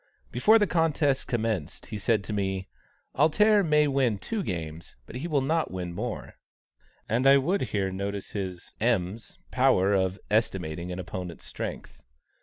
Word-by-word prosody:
Before 210 - +5
the 210 - +3
contest 155 -6 +1
commenced, 110 -9 -2
he 105 - -6
said 105 0 +1
to 105 - -5
me: 95 -2 -2 0.5
"'Alter' 205 +8 +4
may 150 -3 +4
win 135 -6 +1
two 220 - -3
games, 85 - -5
but 120 - -8
he 150 +7 -4
will 145 -5 +1
not 160 +4 +1
win 90 -2 -5
more;" 110 +5 -5 0.7
and 125 +5 +2
I 140 0 +8
would 175 +9 +1
here 95 -2 -1
notice 100 +1 -4
his 95 -3 -5
(M.'s) 110 -2 -1
power 95 +2 +3
of 95 -1 +1
estimating 90 -6 0
an 90 - -4
opponent's 90 -1 -6
strength. - - -6
105 Hz, 155 wpm, -27 LUFS, 95-140 Hz, 0.7 s, I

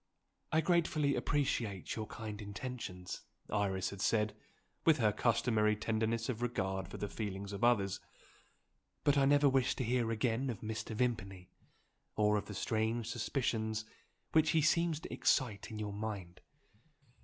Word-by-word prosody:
"I 160 - +4
gratefully 160 -4 +2
appreciate 115 -9 -1
your 110 -1 -4
kind 110 -2 -6
intentions," 100 -3 -6 0.3
Iris 95 -3 0
had 100 -1 -7
said, 105 -1 +2 0.5
with 160 -2 +5
her 110 -5 +3
customary 105 -1 +2
tenderness 110 +1 0
of 120 -3 -3
regard 95 -6 -1
for - - -8
the 105 - -3
feelings 100 -1 -4
of 100 - -5
others; 100 -5 +3 1.0
"but 145 - +4
I 140 -1 +4
never 145 +1 +5
wish 135 -2 +3
to 130 - -2
hear 120 -1 +1
again 115 +3 0
of 115 - -4
Mr. 110 0 -4
Vimpany, 100 -7 -2 0.6
or 105 0 +3
of 105 - -1
the 105 - -6
strange 110 +2 0
suspicions 110 -3 -1 0.5
which 160 0 +4
he - - +5
seems 170 0 +3
to - - -7
excite 115 -7 +1
in 110 - -6
your 105 -1 -3
mind." 100 -4 -5
110 Hz, 150 wpm, -34 LUFS, 105-125 Hz, 1.0 s, with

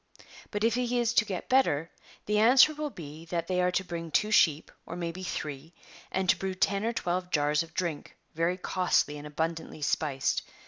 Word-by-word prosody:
But 205 0 -3
if 230 0 +3
he 245 0 0
is 235 -1 +1
to 215 - +4
get 190 -3 -5
better 165 - +2 0.3
the 210 0 +1
answer 255 +7 +7
will 300 0 -3
be 160 - -10
that 170 0 -2
they 180 +1 0
are 180 - +3
to 180 +1 0
bring 170 -2 -6
two 210 +7 +1
sheep, 160 -7 +3
or 165 - -8
may 170 -1 -3
be 185 +3 -9
three; 150 -3 -5 0.4
and 190 0 -1
to 190 - +4
brew 190 -1 -3
ten 195 +2 +1
or 230 - +1
twelve 180 -4 -2
jars 150 -2 +2
of 165 -1 -9
drink, 170 -5 -3 0.2
very 170 +3 0
costly 180 -5 0
and 150 - -8
abundantly 160 0 -4
spiced. 140 -2 0
180 Hz, 200 wpm, -29 LUFS, 160-205 Hz, 0.4 s, answer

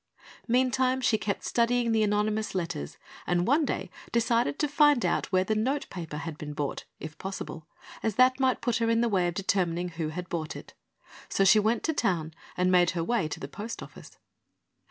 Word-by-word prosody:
Meantime 255 +1 +2
she 255 -3 +2
kept 205 -2 -2
studying 235 0 +1
the 220 -1 +3
anonymous 210 0 0
letters 170 -4 -3 0.3
and 175 0 +1
one 290 - +3
day - - -3 0.2
decided 235 +3 +1
to 300 - +1
find 290 -3 +4
out - - 0
where 185 -1 +3
the 215 - 0
notepaper 215 - -2
had 160 0 -6
been 150 -1 -6
bought, 145 -1 -3
if 155 -1 -8
possible, 185 -5 -6 0.3
as 220 -3 -1
that 255 +1 +4
might 260 -1 +2
put 240 -3 +1
her 230 -1 +1
in 230 0 +3
the 235 - +2
way 190 -5 +2
of 175 - -3
determining 180 -2 0
who 165 -2 -4
had 180 +3 -6
bought 160 -3 -4
it. - - -10 0.6
So 195 - +2
she 195 +3 +6
went 220 +2 +1
to 320 - +1
town 170 - 0 0.2
and 180 0 +2
made 180 -1 +5
her 165 - 0
way 235 -4 0
to 155 - -6
the 135 - -6
post 210 +10 -7
office. - - -13
210 Hz, 195 wpm, -28 LUFS, 175-240 Hz, 0.6 s, she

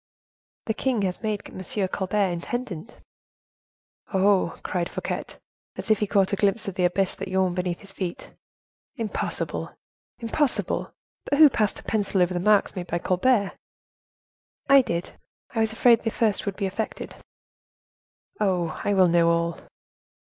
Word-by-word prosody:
"The 220 - 0
king 240 -2 0
has 185 -2 -2
made 215 -2 -2
M. 190 +1 -2
Colbert 195 0 0
intendant." 200 +2 -5 1.2
"Oh!" 190 -3 +2
cried 175 -1 -2
Fouquet, - - -3 0.5
as 225 - -3
if 215 - +4
he 210 - 0
caught 195 -1 +2
a - - +4
glimpse 200 +2 +1
of 195 - -3
the 180 0 +1
abyss 185 +1 +1
that - - -6
yawned 185 -1 +1
beneath 180 -1 -2
his 195 -1 -10
feet, 185 -3 -5 0.6
"impossible! 225 -5 -3 0.4
impossible! 250 +4 -1 0.4
But 285 - +2
who 305 -2 +8
passed 215 -4 0
a - - -22
pencil 205 -3 0
over 180 +1 -1
the 175 - -1
marks 210 +2 +3
made 180 -1 -5
by 170 - -1
Colbert?" 200 +4 +2 1.2
"I 275 0 +8
did. 170 -7 -4 0.3
I 225 - -2
was 220 0 +2
afraid 230 0 +4
the 225 - -1
first 215 -2 0
would 200 - -1
be 200 - -2
effaced." 195 +3 -4 1.3
"Oh! 180 -6 0
I 205 - +1
will 185 -1 +6
know 170 0 +4
all." 170 0 0
195 Hz, 155 wpm, -25 LUFS, 180-220 Hz, 1.3 s, who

